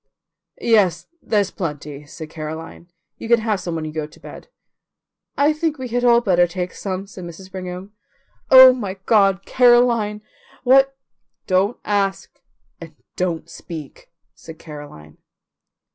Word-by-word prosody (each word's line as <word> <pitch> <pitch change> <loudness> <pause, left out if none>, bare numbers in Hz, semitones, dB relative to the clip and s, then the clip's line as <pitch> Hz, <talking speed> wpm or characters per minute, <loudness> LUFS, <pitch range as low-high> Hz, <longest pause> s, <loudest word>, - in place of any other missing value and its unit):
"Yes, 185 -8 +2 0.2
there's 205 -3 0
plenty," 150 -4 -6
said 160 0 -10
Caroline; 160 +2 -8 0.3
"you - - -7
can 235 0 +5
have 215 -3 -1
some 175 -2 -4
when 160 -1 -4
you 155 - -5
go 155 -1 -4
to - - -19
bed." - - -12 0.9
"I 290 +2 +3
think 310 0 -2
we 260 -2 -6
had 245 +1 -1
all 235 -1 +5
better 175 -6 +3
take 180 +1 -5
some," 190 -1 -5
said 195 -2 -11
Mrs. 175 +2 -10
Brigham. 185 +1 -7 0.6
"Oh, 260 0 +10
my 205 -7 -5
God, 195 -3 +3
Caroline, 240 -4 +3 0.4
what 270 +1 +4 0.2
" - - -55
"Don't 195 +5 +2
ask 200 -2 -2 0.4
and 165 -2 -11 0.2
don't 175 -3 -2
speak," 155 -5 -10 0.2
said 160 -1 -12
Caroline. 145 - -12
190 Hz, 145 wpm, -20 LUFS, 165-230 Hz, 0.9 s, Oh